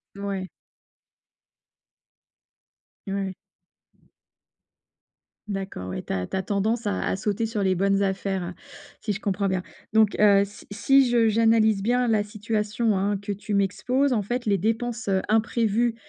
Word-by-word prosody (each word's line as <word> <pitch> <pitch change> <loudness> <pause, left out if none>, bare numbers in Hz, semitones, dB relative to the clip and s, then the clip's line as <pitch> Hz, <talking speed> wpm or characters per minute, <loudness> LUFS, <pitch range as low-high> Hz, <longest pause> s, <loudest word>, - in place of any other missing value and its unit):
Ouais. 195 -2 -4 2.6
Ouais. 195 -1 -2 2.1
D'accord, 195 - -5
ouais, - - -5
tu - - -3
as 90 -1 -2
tu - - -3
as 190 - -1
tendance 215 +4 -1
à 205 - -1
à - - 0
sauter 210 +2 -1
sur 215 -3 -2
les 190 -1 +3
bonnes 195 +2 +2
affaires, 190 -2 -2 0.5
si 215 - -2
je 200 - -3
comprends 200 -1 -1
bien 185 -1 -1 0.3
donc 220 -1 +4
heu, 200 -1 +6
si 205 - -14
si 265 +5 +4
je 230 -2 +4
j'analyse 220 -2 +3
bien 245 +3 +1
la 215 -2 +3
situation, 210 +1 -1
hein, 200 +1 0
que 200 +1 -5
tu 205 +1 -3
m'exposes, 250 +7 +1
en 215 - +1
fait, 240 +4 -3
les 200 -3 +2
dépenses, 230 +2 -2
heu, 190 -1 +2
imprévues 225 +1 +1
205 Hz, 145 wpm, -25 LUFS, 195-225 Hz, 2.6 s, heu